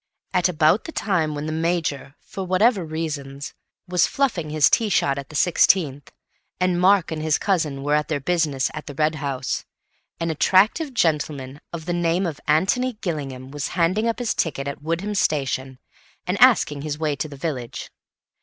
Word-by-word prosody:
At 180 -1 +3
about 160 +4 +3
the 325 - -6
time 165 - 0
when 145 +1 -4
the 155 - -3
Major 160 -4 -2
(for 195 - -7
whatever 190 +3 +2
reasons) 145 -4 -5 0.3
was 180 -1 +3
fluffing 245 - -1
his 150 -2 +4
tee 225 -2 +2
shot 140 -7 +1
at 140 - -9
the 155 - -11
sixteenth, 150 -3 +2 0.5
and 180 -1 +1
Mark 190 -2 +4
and 155 -1 -3
his 155 -1 +2
cousin 155 -9 -1
were 145 +1 0
at 150 0 +2
their 155 -2 -1
business 145 -3 0
at 155 - -7
the 145 - -7
Red 155 +2 +2
House, 135 -2 -2 0.6
an 165 0 -1
attractive 215 - +3
gentleman 145 - -1
of 165 -2 -6
the 175 - -1
name 175 +2 +1
of 160 -4 -4
Antony 195 +12 +2
Gillingham 140 - -5
was 145 0 -3
handing 185 +7 +2
up 230 - 0
his 245 -2 -1
ticket 140 -4 -2
at 140 0 -5
Woodham 170 +7 -2
station 135 -7 -1 0.5
and - - -2
asking 145 -1 +5
the 150 0 -4
way 155 -2 -1
to 150 - -3
the 140 - -10
village. 135 -6 -5
155 Hz, 180 wpm, -23 LUFS, 145-180 Hz, 0.6 s, asking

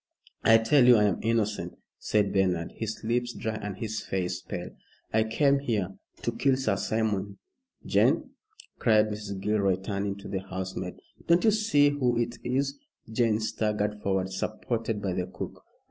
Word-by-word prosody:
"I 115 - +7
tell 120 +4 +4
you 125 - +9
I 105 - +4
am 100 -3 +2
innocent," 110 -2 -1 0.2
said 105 -2 +1
Bernard, 90 -4 +1
his 110 0 -5
lips 120 +2 0
dry 110 - -3
and 105 -3 -5
his 110 -1 -3
face 90 -2 -2
pale. - - -6 0.4
"I 110 0 +4
came 140 +5 +2
here 110 -9 -1 0.2
" - - -28
"To 120 - 0
kill 130 +3 +2
Sir 135 - +1
Simon. 105 -3 -1 0.5
Jane," - - +2 0.5
cried 110 -2 +4
Mrs. 105 -2 -5
Gilroy, 100 -2 +2
turning 100 +1 -3
to 100 0 -10
the 95 - -2
housemaid. 95 -1 -5 0.3
"Don't 170 +1 +4
you 220 - +6
see 210 -10 +4
who 130 -4 +1
it 120 0 -1
is?" 140 +3 -1 0.3
Jane 110 -2 +2
staggered 105 -1 -1
forward 95 -1 0
supported 110 +2 -2
by 95 -2 0
the 90 0 -2
cook. - - -7
110 Hz, 165 wpm, -28 LUFS, 100-120 Hz, 0.5 s, you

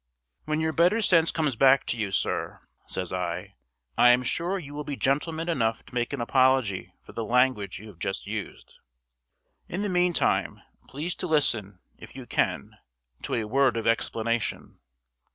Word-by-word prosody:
"When 155 +1 -1
your 160 0 0
better 175 +8 +3
sense 165 -4 +4
comes 150 -6 0
back 135 +2 +5
to - - -2
you, 105 -4 -2
sir," 95 - -2 0.3
says 90 -1 -3
I, 90 -3 -3 0.5
"I 125 - +8
am 125 +1 +5
sure 170 +9 -1
you 145 -6 -8
will 150 0 -4
be 145 -1 -4
gentleman 160 +5 -1
enough 115 -9 0
to - - -17
make 120 -1 -1
an 140 - -3
apology 130 -4 +1
for - - -13
the 115 - -3
language 125 -2 +1
you 110 +1 -11
have 90 -5 -15
just - - -3
used. - - -7 0.9
In 190 +4 -3
the 205 - -1
meantime, 180 -1 +1 0.2
please 155 +6 -4
to 180 - -4
listen, 110 - +1 0.2
if - - -12
you - - -8
can, - - -1 0.4
to - - -3
a 115 - 0
word 125 +2 +2
of 115 - -3
explanation. 115 0 -1
130 Hz, 170 wpm, -26 LUFS, 115-160 Hz, 0.9 s, I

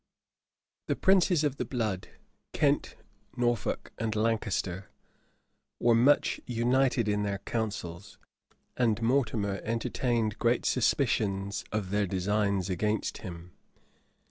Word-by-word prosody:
The - - +1
princes 185 -4 +3
of 145 -2 0
the - - -1
blood, 110 -7 -2 0.5
Kent, - - +1 0.4
Norfolk, 120 -2 -1
and 110 -1 -1
Lancaster, 105 -4 -1 0.9
were 120 0 +4
much 125 +6 +3
united 125 0 +2
in 105 0 +1
their 100 -1 -1
councils; 100 -4 -4 0.6
and 115 -3 +2
Mortimer 110 -6 +1
entertained 115 -1 -1
great 120 +1 +2
suspicions 105 -6 +1
of 105 -3 -2
their 105 -1 +1
designs 100 0 0
against 105 +3 -1
him. 90 -3 -9
110 Hz, 105 wpm, -29 LUFS, 100-120 Hz, 0.9 s, were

